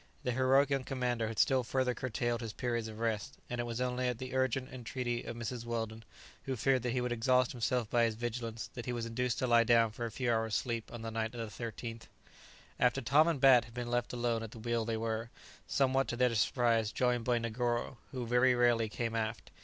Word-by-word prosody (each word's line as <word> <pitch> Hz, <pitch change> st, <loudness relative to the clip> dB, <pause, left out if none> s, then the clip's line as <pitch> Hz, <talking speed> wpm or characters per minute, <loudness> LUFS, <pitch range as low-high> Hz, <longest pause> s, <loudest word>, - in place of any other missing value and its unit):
The 125 Hz, -, 0 dB
heroic 130 Hz, +3 st, +3 dB
young 135 Hz, -1 st, +1 dB
commander 125 Hz, -4 st, -1 dB
had 110 Hz, -1 st, -5 dB
still 130 Hz, +3 st, +3 dB
further 125 Hz, +2 st, 0 dB
curtailed 120 Hz, -1 st, -2 dB
his 115 Hz, -2 st, -5 dB
periods 120 Hz, -2 st, -2 dB
of 110 Hz, -1 st, -8 dB
rest, 110 Hz, -2 st, -2 dB
and 120 Hz, 0 st, -1 dB
it -, -, -3 dB
was 120 Hz, 0 st, -4 dB
only 125 Hz, 0 st, 0 dB
at 125 Hz, -2 st, -1 dB
the 130 Hz, +1 st, -6 dB
urgent 130 Hz, 0 st, 0 dB
entreaty 120 Hz, -1 st, -3 dB
of -, -, -5 dB
Mrs. 120 Hz, 0 st, -4 dB
Weldon, 115 Hz, -1 st, -4 dB, 0.4 s
who 135 Hz, -, -1 dB
feared 130 Hz, +2 st, +2 dB
that 120 Hz, 0 st, -1 dB
he 125 Hz, -, 0 dB
would 125 Hz, 0 st, -2 dB
exhaust 125 Hz, +1 st, +3 dB
himself 120 Hz, -1 st, 0 dB
by 120 Hz, +2 st, +3 dB
his 115 Hz, -1 st, -1 dB
vigilance, 115 Hz, 0 st, -4 dB
that 120 Hz, -, -7 dB
he 125 Hz, -, -1 dB
was 120 Hz, -1 st, -3 dB
induced 120 Hz, +1 st, -1 dB
to -, -, 0 dB
lie 120 Hz, -1 st, +5 dB
down 115 Hz, -1 st, +4 dB
for 120 Hz, +2 st, -4 dB
a -, -, -8 dB
few 120 Hz, 0 st, 0 dB
hours' 110 Hz, -1 st, 0 dB
sleep 115 Hz, 0 st, -2 dB
on 120 Hz, -1 st, -7 dB
the 115 Hz, -, -4 dB
night 110 Hz, +1 st, -2 dB
of 115 Hz, -2 st, -5 dB
the -, -, -6 dB
13th. 115 Hz, 0 st, -6 dB, 0.7 s
After 125 Hz, -1 st, +3 dB
Tom 145 Hz, +7 st, +4 dB
and 165 Hz, -5 st, +1 dB
Bat 130 Hz, -2 st, +7 dB
had 115 Hz, -, -15 dB
been 120 Hz, -1 st, -4 dB
left 120 Hz, 0 st, 0 dB
alone 120 Hz, -2 st, 0 dB
at 115 Hz, -, -5 dB
the 115 Hz, -, -12 dB
wheel 115 Hz, 0 st, -1 dB
they 115 Hz, 0 st, -1 dB
were, 115 Hz, 0 st, -2 dB, 0.4 s
somewhat 135 Hz, 0 st, +2 dB
to -, -, -2 dB
their 125 Hz, -1 st, +3 dB
surprise, 115 Hz, 0 st, +2 dB
joined 125 Hz, -2 st, +1 dB
by 120 Hz, 0 st, +2 dB
Negoro, 120 Hz, +1 st, -2 dB
who 125 Hz, -3 st, -4 dB
very 125 Hz, +2 st, +4 dB
rarely 120 Hz, -2 st, +3 dB
came 115 Hz, +1 st, -3 dB
aft. 110 Hz, 0 st, -3 dB
120 Hz, 230 wpm, -33 LUFS, 115-125 Hz, 0.7 s, Bat